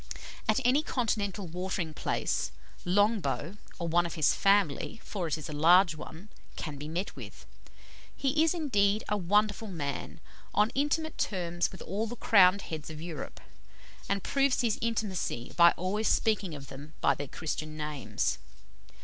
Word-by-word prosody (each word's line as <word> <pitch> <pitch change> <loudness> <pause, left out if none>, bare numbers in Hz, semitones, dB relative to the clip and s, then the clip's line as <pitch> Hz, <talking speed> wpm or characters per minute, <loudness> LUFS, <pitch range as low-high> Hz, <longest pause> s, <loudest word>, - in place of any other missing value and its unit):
At - - +4
any 260 +4 +4
Continental 210 - -1
watering 180 -1 -3
place, - - -1 0.3
Longbow, 205 -1 +1 0.2
or 170 - -3
one 170 +1 +3
of - - -7
his 155 -3 +3
family 195 0 +2
for 190 -5 -3
it 160 - -1
is 155 - -7
a 155 - -6
large 170 +4 +6
one 160 +6 -10 0.3
can 150 -3 -5
be 150 +2 -6
met 175 +5 -3
with. - - -10 0.7
He 285 +3 +2
is, 325 +2 +2
indeed, 210 -10 +2
a 210 - +2
wonderful 205 +3 +1
man 145 -8 -4 0.4
on 210 +2 +4
intimate 295 +3 -1
terms 175 -3 -1
with 190 - -9
all 210 +5 -2
the 240 - -6
crowned 195 -4 +5
heads 155 -2 -6
of 155 -1 -8
Europe, 160 -4 -7 0.7
and 200 -1 0
proves 275 -2 +2
his 230 -3 0
intimacy 210 - -2
by 170 0 +8
always 205 +5 -1
speaking 205 -7 +1
of 140 -2 -9
them 145 +3 -10
by 140 - +4
their 140 +2 -5
Christian 155 +1 -4
names. 150 -2 -2
185 Hz, 160 wpm, -30 LUFS, 160-215 Hz, 0.7 s, by